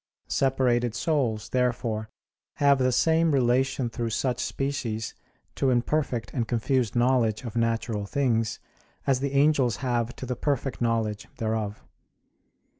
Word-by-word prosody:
Separated 125 -3 +1
souls, 125 -10 0
therefore, 120 -4 -1 0.5
have 140 -1 +4
the 130 0 +3
same 160 +5 +3
relation 130 0 +2
through 115 0 -3
such 120 +2 -1
species 130 -6 -2 0.4
to 135 - +1
imperfect 125 0 0
and 120 -4 -1
confused 120 +1 0
knowledge 120 -3 +2
of 120 -2 -6
natural 115 -3 0
things 115 -4 0 0.5
as 135 -2 +2
the 140 0 -2
angels 140 -5 +3
have 120 -1 0
to - - -7
the 125 0 -2
perfect 135 -1 -2
knowledge 110 -3 0
thereof. 110 -2 -2
120 Hz, 125 wpm, -26 LUFS, 115-135 Hz, 0.5 s, have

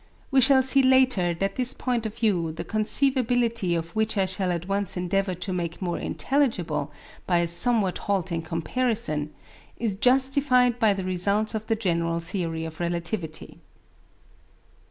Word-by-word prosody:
We 270 -1 +4
shall 265 +1 +5
see 270 +1 +4
later 255 -10 +3
that 195 +7 -3
this 255 0 +3
point 240 -3 -2
of 215 - -10
view, 180 -8 0
the 165 - -6
conceivability 235 -3 +1
of 165 0 -5
which 220 0 0
I 195 - +2
shall 185 0 -2
at 175 0 -4
once 195 -1 -2
endeavour 185 +1 -1
to 185 +2 -5
make 170 -2 -4
more 175 -3 -3
intelligible 175 - -1 0.4
by 175 - +2
a 170 - +1
somewhat 195 +3 +2
halting 190 -4 -2
comparison, 165 -1 -1 0.5
is 225 -4 -2
justified 250 +1 +3
by 215 -4 +3
the 190 - -4
results 200 +4 +1
of 220 0 -5
the 225 - +1
general 170 -5 -1
theory 165 -2 -4
of 160 -1 -9
relativity. 170 -1 -4
195 Hz, 155 wpm, -25 LUFS, 170-240 Hz, 0.5 s, shall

